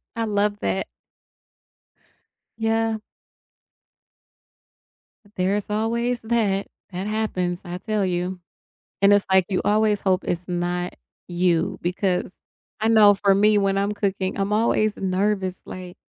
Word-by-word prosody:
I 230 - -1
love 205 -1 0
that. 95 0 -1 1.7
Yeah. 225 0 0 2.4
There's 195 +3 0
always 235 +3 -1
that, 220 -4 0 0.2
that 185 +2 -4
happens 185 -5 -1
I 175 0 -5
tell 210 0 -1
you, 180 0 -2 0.6
and 200 +1 +6
it's 205 -1 +3
like 190 -1 +5
you 190 -2 0
always 210 -1 +2
hope 190 -1 +1
it's 175 +1 -3
not 175 0 -2 0.3
you 175 -1 +1
because 180 +1 -1 0.5
I 220 - +1
know 215 -2 +7
for 195 0 +3
me 210 +2 +4
when 195 -1 +1
I'm 200 +1 0
cooking 195 -2 -2
I'm 195 +1 -1
always 215 -1 +2
nervous 190 0 -1
like, 180 -1 -9
195 Hz, 125 wpm, -23 LUFS, 185-215 Hz, 2.4 s, know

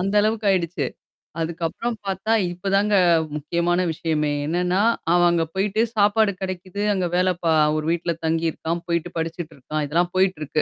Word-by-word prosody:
அந்த 195 +3 -1
அளவுக்கு 215 -1 0
ஆயிடுச்சு. 170 -5 -1 0.5
அதுக்கப்புறம் 170 +8 -2
பார்த்தா 195 +3 -2 0.2
இப்போதாங்க 200 +3 +1 0.4
முக்கியமான 170 +4 0
விஷயமே 155 -2 -1
என்னென்னா 180 +4 0 0.3
அவன் 175 0 +5
அங்கே 165 -1 +1
போயிட்டு 205 +3 +1
சாப்பாடு 210 0 +3
கிடைக்குது 185 +1 -5
அங்கே 185 -2 0
வேலை 185 +1 +3
பா 165 - +2 0.3
ஒரு 155 - -3
வீட்டுல 170 0 -1
தங்கியிருக்கிறான், 165 +1 -1
போயிட்டு 170 0 -1
படிச்சிட்டு 165 0 -4
இருக்கான். 150 +3 -4
இதெல்லாம் 175 +4 +1
போயிட்டிருக்கு 160 -6 +1
175 Hz, 140 wpm, -23 LUFS, 165-195 Hz, 0.5 s, அவன்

